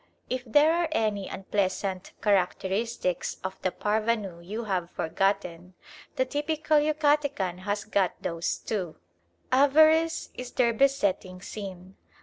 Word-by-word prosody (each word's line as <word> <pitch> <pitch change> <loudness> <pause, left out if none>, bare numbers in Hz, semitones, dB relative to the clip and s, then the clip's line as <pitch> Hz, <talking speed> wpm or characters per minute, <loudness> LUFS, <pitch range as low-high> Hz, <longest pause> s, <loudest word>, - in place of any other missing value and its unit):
If 255 0 -1
there 295 +7 +5
are 340 0 +1
any 210 -6 0
unpleasant 190 -1 -2
characteristics 195 +1 0
of 190 0 -5
the 185 - +1
parvenu 210 -3 -1
you 215 +6 -5
have 185 -5 -2
forgotten, 180 0 -1 0.4
the 260 - +1
typical 300 +2 +1
Yucatecan 290 - +1
has 205 +2 -2
got 200 -4 0
those 170 0 -2
too. 185 -7 -4 0.6
Avarice 315 +5 +4
is 250 0 -8
their 235 -2 +3
besetting 205 -8 +1
sin. 190 -1 -8
210 Hz, 120 wpm, -27 LUFS, 185-275 Hz, 0.6 s, there